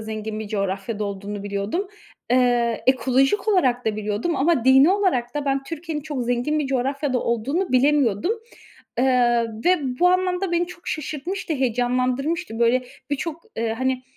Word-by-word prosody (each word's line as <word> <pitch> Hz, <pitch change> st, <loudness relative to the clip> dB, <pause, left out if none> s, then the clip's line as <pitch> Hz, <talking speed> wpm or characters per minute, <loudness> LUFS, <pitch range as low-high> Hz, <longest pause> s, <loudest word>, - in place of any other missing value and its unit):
zengin 215 Hz, 0 st, -5 dB
bir 215 Hz, -, -6 dB
coğrafyada 200 Hz, +1 st, -2 dB
olduğunu 200 Hz, 0 st, -5 dB
biliyordum. 205 Hz, -, -2 dB, 0.4 s
Eee, 245 Hz, -2 st, +2 dB
ekolojik 265 Hz, -, +2 dB
olarak 255 Hz, -, +2 dB
da 220 Hz, -1 st, 0 dB
biliyordum 215 Hz, +9 st, -2 dB
ama 285 Hz, -4 st, +2 dB
dini 265 Hz, +5 st, +7 dB
olarak 360 Hz, -12 st, 0 dB
da 295 Hz, -, -2 dB
ben 275 Hz, -1 st, 0 dB
Türkiye'nin 320 Hz, +1 st, -5 dB
çok 290 Hz, -4 st, -3 dB
zengin 245 Hz, +5 st, 0 dB
bir 295 Hz, -, -1 dB
coğrafyada 270 Hz, +1 st, 0 dB
olduğunu 270 Hz, -, -1 dB
bilemiyordum. 265 Hz, -, +3 dB, 0.7 s
Eee, 245 Hz, -2 st, +3 dB, 0.2 s
ve 360 Hz, +1 st, +4 dB, 0.2 s
bu 360 Hz, -, +6 dB
anlamda 365 Hz, 0 st, +1 dB
beni 345 Hz, +1 st, +1 dB
çok 355 Hz, 0 st, -10 dB
şaşırtmıştı, 315 Hz, +5 st, -4 dB
heyecanlandırmıştı. 255 Hz, +3 st, -1 dB
Böyle, 240 Hz, +2 st, +3 dB, 0.3 s
birçok, 315 Hz, +3 st, -3 dB
eee, 225 Hz, -1 st, -1 dB
hani, 260 Hz, 0 st, 0 dB
260 Hz, 145 wpm, -23 LUFS, 235-310 Hz, 0.7 s, dini